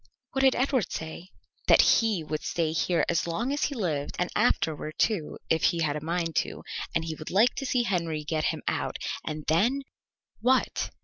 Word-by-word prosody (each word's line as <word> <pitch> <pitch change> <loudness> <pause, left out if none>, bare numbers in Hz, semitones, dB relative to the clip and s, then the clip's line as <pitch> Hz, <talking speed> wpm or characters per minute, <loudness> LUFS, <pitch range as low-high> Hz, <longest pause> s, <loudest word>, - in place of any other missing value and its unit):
"What 270 - 0
did 265 -1 +5
Edward 255 - +1
say?" 160 +3 -6 0.4
"That - - +8 0.2
he 220 -7 0
would 155 0 -3
stay 165 -2 -1
here 170 +1 +1
as 170 - +1
long 235 +11 -1
as 290 - +1
he 285 - -3
lived 155 - -2
and 180 - -1
afterward, 155 -1 +1
too, 195 -9 0
if 160 - +2
he 170 - +3
was 145 -1 -1
a 150 - -5
mind 165 -1 -2
to, - - -1 0.3
and 165 - +1
he 160 - -3
would 155 0 -8
like 220 +6 +4
to 270 - -2
see 250 -1 +2
Henry 170 -7 -1
get 155 0 -1
him - - -1
out; - - -1 0.3
and 155 0 -4
then 235 - +2 0.3
" - - -46
"What?" 255 +3 +2
170 Hz, 200 wpm, -27 LUFS, 155-235 Hz, 0.4 s, That